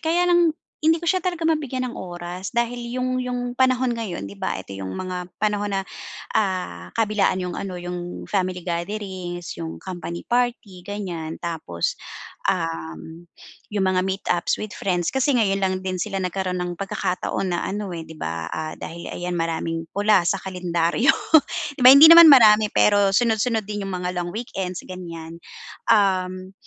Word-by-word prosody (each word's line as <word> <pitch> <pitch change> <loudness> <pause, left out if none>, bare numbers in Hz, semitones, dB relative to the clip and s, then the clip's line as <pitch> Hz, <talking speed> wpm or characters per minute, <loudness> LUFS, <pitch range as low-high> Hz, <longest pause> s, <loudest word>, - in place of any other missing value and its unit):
kaya 335 +2 +2
lang 345 -3 +3 0.2
hindi 320 +1 +3
ko 340 - -2
siya 370 0 +1
talaga 350 -2 -2
mabigyan 270 -5 -1
ng 240 - -8
oras 175 +1 -6
dahil 235 0 0 0.2
yung 255 0 -1
yung 250 -1 -3 0.2
panahon 255 -1 +2
ngayon 185 - -5
'di 100 - -11
ba 95 - -2
ito 95 +1 -9
yung 95 -1 -5
mga 180 -1 -4 0.2
panahon 205 -1 0
na, 195 0 0 0.5
ah, 180 - -1
kabilaan 210 -4 +1
yung 180 -1 -4
ano, 190 -2 -5
yung 175 0 -6
family 185 -2 -1
gatherings, 175 -1 -4
yung 165 -1 -5
company 175 -2 -6
party 235 -7 -1
ganiyan, 180 -6 -5
tapos, 160 - -3 0.5
um, 80 - -3 0.5
yung 200 -2 +1
mga 185 -1 +2
meet-ups 190 -2 -1
with 215 - -5
friends. 180 -3 -1
Kasi 265 +1 +1
ngayon 200 -5 +2
lang 190 -1 +1
din 185 -1 -2
sila 195 +1 -2
nagkaroon 185 0 -2
ng 180 0 -2
pagkakataon 190 -1 -2
na - - -3
ano, 205 0 -4
eh, 165 - -6
'di 160 - -11
ba, 80 0 -3
ah, 155 0 -4
dahil 170 +1 -7
ayan 175 0 -4
maraming 165 -1 -2
pula 205 -1 +3
sa - - +2
kalendaryo 180 +3 +1 0.7
'di - - -9
ba 250 - +10
hindi 280 +3 +10
naman 335 0 +11
marami 220 -6 +7
pero 205 -1 +4
sunod-sunod 225 -1 +1
din 205 0 -4
yung - - -5
mga 180 0 -3
long 175 -1 -2
weekends 190 -5 -5
ganiyan. 170 -2 -8 0.5
Um, 185 -3 +2
190 Hz, 165 wpm, -23 LUFS, 175-225 Hz, 0.7 s, naman